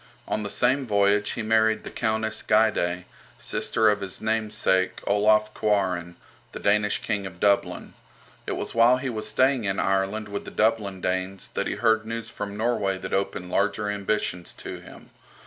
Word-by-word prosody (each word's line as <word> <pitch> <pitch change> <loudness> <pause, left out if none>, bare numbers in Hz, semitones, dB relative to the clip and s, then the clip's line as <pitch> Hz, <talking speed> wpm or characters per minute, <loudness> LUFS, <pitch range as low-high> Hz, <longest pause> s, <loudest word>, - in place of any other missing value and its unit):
On 110 - -1
the 105 - -4
same 130 +5 +1
voyage 100 -1 +2
he 115 - -4
married 110 0 +2
the - - -8
Countess 110 -1 -1
Gyde, 90 -5 +2 0.3
sister 110 - 0
of 105 -1 +3
his 95 -1 -5
namesake, 110 -4 0
Olaf 105 +1 +3
Kvaran, 90 -5 0 0.4
the - - -6
Danish 105 0 +1
King 105 -3 -2
of 90 -1 -12
Dublin. 100 0 +1 0.5
It - - -1
was - - -4
while 115 +2 +5
he 130 0 -3
was 110 -2 -4
staying 130 -3 +2
in 95 0 -1
Ireland 95 +3 0
with 100 0 -5
the - - -8
Dublin 105 -4 0
Danes 95 +1 -2
that - - -2
he - - -2
heard 110 0 +2
news 115 0 -4
from 100 -1 -6
Norway 105 -4 0
that 95 - -6
opened 95 -2 -2
larger 105 +1 0
ambitions 100 -3 -2
to - - -7
him. - - -14
105 Hz, 170 wpm, -25 LUFS, 95-110 Hz, 0.5 s, while